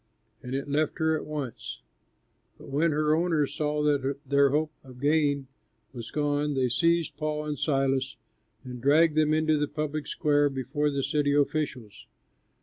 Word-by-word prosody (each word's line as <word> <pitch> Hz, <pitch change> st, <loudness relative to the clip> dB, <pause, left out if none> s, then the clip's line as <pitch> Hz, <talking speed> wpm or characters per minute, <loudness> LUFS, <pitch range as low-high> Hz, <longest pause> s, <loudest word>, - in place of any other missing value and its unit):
And 125 Hz, +1 st, -5 dB
it 140 Hz, -, -3 dB
left 150 Hz, +1 st, 0 dB
her 160 Hz, 0 st, +2 dB
at 155 Hz, -, -5 dB
once. 145 Hz, -5 st, -6 dB, 0.7 s
But -, -, -13 dB
when 150 Hz, +5 st, +2 dB
her 150 Hz, 0 st, +2 dB
owners 160 Hz, -4 st, +1 dB
saw 150 Hz, 0 st, -1 dB
that 140 Hz, -2 st, +1 dB
their 140 Hz, 0 st, +4 dB
hope 150 Hz, +2 st, 0 dB
of 130 Hz, -2 st, -13 dB
gain 145 Hz, -1 st, +2 dB, 0.5 s
was 120 Hz, -3 st, -7 dB
gone, 145 Hz, -1 st, 0 dB
they 130 Hz, -1 st, +1 dB
seized 165 Hz, +5 st, +1 dB
Paul 150 Hz, 0 st, -2 dB
and 150 Hz, -3 st, -4 dB
Silas 135 Hz, -2 st, 0 dB, 0.5 s
and 125 Hz, -2 st, -8 dB
dragged 155 Hz, +4 st, +4 dB
them 155 Hz, -1 st, +3 dB
into 155 Hz, -1 st, +2 dB
the 150 Hz, -, 0 dB
public 150 Hz, 0 st, -4 dB
square 145 Hz, -2 st, +2 dB
before 140 Hz, +3 st, -1 dB
the 140 Hz, -1 st, -2 dB
city 145 Hz, -1 st, +1 dB
officials. 140 Hz, -7 st, -2 dB
145 Hz, 160 wpm, -27 LUFS, 135-155 Hz, 0.7 s, their